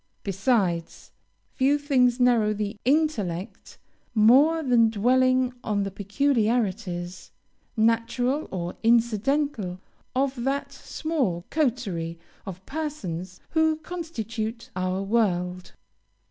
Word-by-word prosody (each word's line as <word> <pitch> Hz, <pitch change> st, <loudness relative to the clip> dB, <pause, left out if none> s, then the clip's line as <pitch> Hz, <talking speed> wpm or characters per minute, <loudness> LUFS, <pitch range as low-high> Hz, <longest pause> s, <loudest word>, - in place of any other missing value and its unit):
Besides, 195 Hz, -4 st, -1 dB, 0.4 s
few 275 Hz, +2 st, +3 dB
things 260 Hz, -4 st, +2 dB
narrow 230 Hz, -4 st, +3 dB
the 205 Hz, +1 st, -3 dB
intellect 235 Hz, -, -1 dB, 0.4 s
more 275 Hz, +9 st, +5 dB
than 240 Hz, -4 st, +4 dB
dwelling 255 Hz, +3 st, +2 dB
on 205 Hz, -3 st, 0 dB
the 195 Hz, -, -4 dB
peculiarities, 205 Hz, -5 st, -1 dB, 0.5 s
natural 230 Hz, +5 st, +1 dB
or 175 Hz, -2 st, -4 dB
incidental, 230 Hz, -2 st, +1 dB, 0.4 s
of 265 Hz, -2 st, 0 dB
that 280 Hz, +1 st, -1 dB
small 265 Hz, -, -2 dB
coterie 215 Hz, -, -1 dB, 0.3 s
of 190 Hz, 0 st, -8 dB
persons 190 Hz, -, -5 dB
who 320 Hz, -1 st, +3 dB
constitute 235 Hz, -, -5 dB
our 185 Hz, +1 st, -1 dB
world. 185 Hz, -4 st, 0 dB
230 Hz, 90 wpm, -25 LUFS, 195-270 Hz, 0.5 s, more